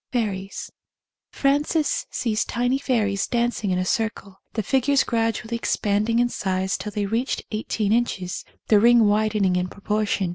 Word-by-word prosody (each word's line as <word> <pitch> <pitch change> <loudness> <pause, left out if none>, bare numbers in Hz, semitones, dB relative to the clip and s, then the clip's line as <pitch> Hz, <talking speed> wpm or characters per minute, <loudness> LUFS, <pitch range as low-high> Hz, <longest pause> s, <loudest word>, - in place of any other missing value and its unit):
Fairies. 200 -5 -3 0.6
Frances 290 +2 +1
sees 225 -2 0
tiny 245 +3 0
fairies 210 -8 0
dancing 240 -3 0
in 180 - +1
a 185 - 0
circle, 200 -2 -2
the 220 - -1
figures 270 +5 +2
gradually 225 0 -1
expanding 215 0 0
in 240 0 +4
size 190 -4 -1
till 210 - -5
they 205 0 -2
reached 230 +6 -1
eighteen 215 -1 -1
inches, 190 -7 -1 0.3
the 210 - +6
ring 235 +1 +6
widening 210 -2 +2
in 180 0 0
proportion. 205 -1 -1
215 Hz, 145 wpm, -23 LUFS, 200-240 Hz, 0.6 s, the